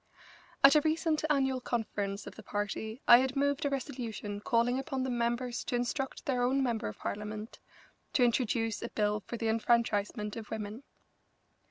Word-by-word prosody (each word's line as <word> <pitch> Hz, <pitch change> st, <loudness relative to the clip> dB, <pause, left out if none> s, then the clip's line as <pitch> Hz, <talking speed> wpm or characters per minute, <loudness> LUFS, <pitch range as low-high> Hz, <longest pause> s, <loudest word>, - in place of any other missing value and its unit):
At 275 Hz, -, +10 dB
a 300 Hz, -, +6 dB
recent 315 Hz, 0 st, +1 dB
annual 265 Hz, -3 st, +2 dB
conference 205 Hz, -4 st, -2 dB
of -, -, -8 dB
the -, -, -11 dB
party 215 Hz, +4 st, -4 dB
I 240 Hz, -, +10 dB
had 265 Hz, +1 st, 0 dB
moved 285 Hz, +1 st, +1 dB
a -, -, +2 dB
resolution 235 Hz, -6 st, -4 dB
calling 235 Hz, +4 st, +1 dB
upon 270 Hz, -1 st, -2 dB
the 260 Hz, -, -1 dB
members 240 Hz, +1 st, -1 dB
to -, -, -1 dB
instruct 265 Hz, +3 st, -2 dB
their 255 Hz, -3 st, 0 dB
own 265 Hz, +2 st, +2 dB
member 235 Hz, -4 st, -1 dB
of 105 Hz, -, -6 dB
Parliament 210 Hz, +1 st, -5 dB, 0.5 s
to 255 Hz, -, +4 dB
introduce 225 Hz, -2 st, 0 dB
a -, -, -4 dB
bill 210 Hz, 0 st, 0 dB
for 235 Hz, +3 st, -7 dB
the 225 Hz, -, -2 dB
enfranchisement 220 Hz, -2 st, +1 dB
of 220 Hz, -2 st, -7 dB
women. 215 Hz, +2 st, -5 dB
235 Hz, 170 wpm, -31 LUFS, 215-265 Hz, 0.5 s, At